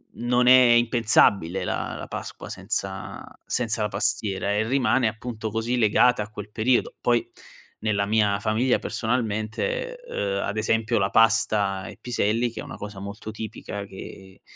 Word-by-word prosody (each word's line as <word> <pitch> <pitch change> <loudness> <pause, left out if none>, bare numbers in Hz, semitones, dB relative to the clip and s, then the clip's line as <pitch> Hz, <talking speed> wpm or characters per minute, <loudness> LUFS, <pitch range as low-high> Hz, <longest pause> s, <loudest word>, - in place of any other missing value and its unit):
non 125 +1 +1
è 130 +1 +9
impensabile 110 -6 +3
la - - -3
la - - -7
Pasqua - - -7
senza - - -4 0.2
senza 115 -2 -1
la - - +1
pastiera 100 0 -1
e 110 +2 0
rimane 125 -2 +2
appunto 110 0 -5
così 115 +3 -1
legata 115 +1 +4
a 105 - -11
quel 105 -1 -9
periodo. 120 +3 +1
Poi 120 -1 +1 0.5
nella 100 -2 0
mia 105 -1 +2
famiglia 115 +4 +2
personalmente, 120 - -2
ehm, 100 - -2
ad 105 +2 -3
esempio 110 +1 +1
la 100 0 +1
pasta 105 -4 +2
e - - -10
piselli, 120 0 0
che - - -9
è - - -5
una - - -8
cosa 105 -1 -8
molto 100 +2 -7
tipica 105 -2 -6
che 95 0 -11
110 Hz, 155 wpm, -25 LUFS, 100-120 Hz, 0.5 s, è